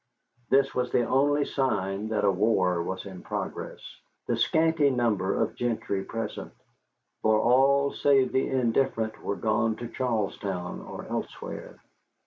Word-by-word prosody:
This 135 0 +3
was 125 -1 -1
the 120 - +3
only 145 +3 +2
sign 105 -6 -1
that 110 -2 0
a 100 - +5
war 95 -3 +2
was 95 +3 -4
in 95 -2 -9
progress, - - -5 0.4
the - - 0
scanty 160 -2 +3
number 110 -7 +1
of - - 0
gentry 110 -5 -2
present, 115 +3 -5 0.7
for 110 0 +4
all 135 +4 +4
save 135 -2 +3
the 130 - +1
indifferent 115 -3 0
were 100 - -1
gone 110 +1 +1
to 120 +2 -6
Charlestown 100 -7 -2
or - - -8
elsewhere. - - -6
115 Hz, 135 wpm, -27 LUFS, 100-135 Hz, 0.7 s, a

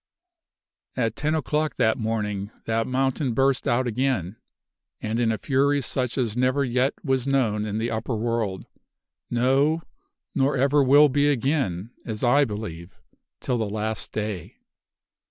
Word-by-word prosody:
"At 115 -3 0
ten 155 +2 0
o'clock 155 0 -1
that 110 -3 +2
morning 105 -3 -2 0.2
that 115 0 0
mountain 130 -1 0
burst 135 0 +2
out 120 +2 +2
again, 120 -6 -1 0.6
and 110 +2 -2
in 115 -2 +2
a 110 - -1
fury 140 +2 +2
such 125 -1 -2
as 115 -5 0
never 130 +3 +2
yet 125 +2 +1
was 130 -2 0
known 115 -6 +1
in 105 0 -3
the 115 +1 -1
upper 115 +2 -2
world 110 -4 -2 0.6
no, 135 +7 +2 0.5
nor 135 +1 +1
ever 140 +3 +3
will 145 +3 +7
be 145 +1 +2
again, 125 - 0
as 110 0 -5
I 140 +4 +5
believe, 100 -6 -7 0.4
till 125 -2 -1
the 110 -2 -1
last 110 +1 -3
day. 105 -5 -4
120 Hz, 145 wpm, -25 LUFS, 110-135 Hz, 0.6 s, will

